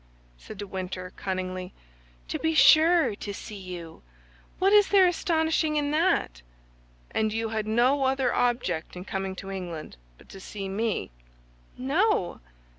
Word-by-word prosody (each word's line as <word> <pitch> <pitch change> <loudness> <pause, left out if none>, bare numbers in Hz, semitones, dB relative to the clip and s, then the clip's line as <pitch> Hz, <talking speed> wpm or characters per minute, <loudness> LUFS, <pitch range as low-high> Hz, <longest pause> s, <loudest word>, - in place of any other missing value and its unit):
said 125 - -11
de 205 - -5
Winter, 185 -1 -5
cunningly. 185 -1 -4 0.6
"To - - -3
be 320 0 0
sure, 315 +2 +6
to 205 - -6
see 210 - -8
you. 175 -3 -9 0.6
What 390 +2 +3
is 415 -1 +7
there 390 -2 +5
astonishing 320 -3 +1
in 290 -1 0
that?" 310 - +1 0.7
"And 220 -1 0
you 225 +1 -2
had 215 -1 -2
no 255 +5 +3
other 265 -2 +1
object 235 -11 -1
in 180 +1 -8
coming 190 -1 -3
to 195 +1 -7
England 175 - -6 0.2
but - - -19
to 195 - -10
see 195 +1 -6
me?" 200 - -2 0.7
"No." 280 - +1
220 Hz, 145 wpm, -27 LUFS, 185-305 Hz, 0.7 s, is